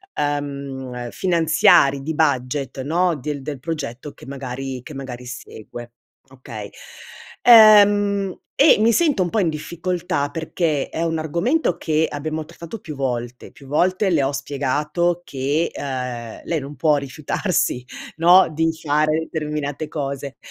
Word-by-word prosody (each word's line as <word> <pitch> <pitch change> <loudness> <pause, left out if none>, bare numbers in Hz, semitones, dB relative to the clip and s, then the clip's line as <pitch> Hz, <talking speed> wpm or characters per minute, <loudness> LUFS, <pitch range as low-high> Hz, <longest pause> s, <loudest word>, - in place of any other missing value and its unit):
ehm, 140 -4 -3
finanziari 160 -5 +4
di 160 +2 -3
budget 135 -2 0
no, 170 +3 +1
del 145 0 -5
del 140 -1 -6
progetto 145 -3 -5
che - - -15
magari 135 -1 -5
che 155 - -10
magari 125 -2 -7
segue, 120 -1 -9 0.4
okay. 115 -6 -9 0.7
Ehm, 205 -4 +6 0.2
e 285 -4 +6
mi 225 +1 +4
sento 290 - +2
un 175 - -2
po' 220 - +1
in 175 -4 +2
difficoltà 170 -2 -3
perché 160 -1 -1
è 165 - -4
un 165 -1 0
argomento 170 - 0
che 155 0 +1
abbiamo 155 +1 -4
trattato 170 +5 -9
più 150 -5 -8
volte, 125 -2 -4
più 140 - -16
volte 185 +7 +1
le 155 -4 +3
ho 135 - 0
spiegato 150 +6 -1
che, 140 +5 -1
ehm, 125 -4 -5
lei 165 -2 -1
non 140 +2 -8
può 150 -3 +3
rifiutarsi 140 0 -1 0.3
no, 175 +3 +6
di 165 +1 +1
fare 155 +1 +1
determinate 150 -1 -3
cose, 140 -2 -5
150 Hz, 140 wpm, -21 LUFS, 135-170 Hz, 0.7 s, Ehm